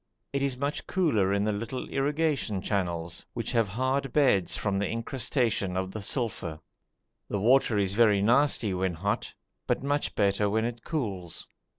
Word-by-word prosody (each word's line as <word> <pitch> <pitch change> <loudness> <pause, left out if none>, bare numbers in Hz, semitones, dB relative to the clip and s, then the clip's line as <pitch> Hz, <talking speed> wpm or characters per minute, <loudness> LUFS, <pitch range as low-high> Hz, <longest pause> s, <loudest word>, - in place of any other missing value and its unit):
It 140 - 0
is 135 -2 0
much 140 +3 -3
cooler 115 - +2
in 100 0 +2
the 105 - +1
little 115 +5 -4
irrigation 145 -6 0
channels, 85 -4 -2
which 115 - -2
have 115 -3 +2
hard 130 +6 -1
beds 125 -11 +3
from 100 -2 0
the 100 - 0
incrustation 115 -5 -1
of 95 0 -2
the 110 - -5
sulphur. 100 - -3 0.7
The 100 - -1
water 120 0 +4
is 100 -1 +1
very 105 -2 +5
nasty 120 -3 +3
when 90 -1 -1
hot, 100 +7 -2 0.3
but - - 0
much 145 +1 -1
better 100 0 +2
when 110 +2 +1
it 120 0 -4
cools. 100 - -3
110 Hz, 165 wpm, -28 LUFS, 100-130 Hz, 0.7 s, very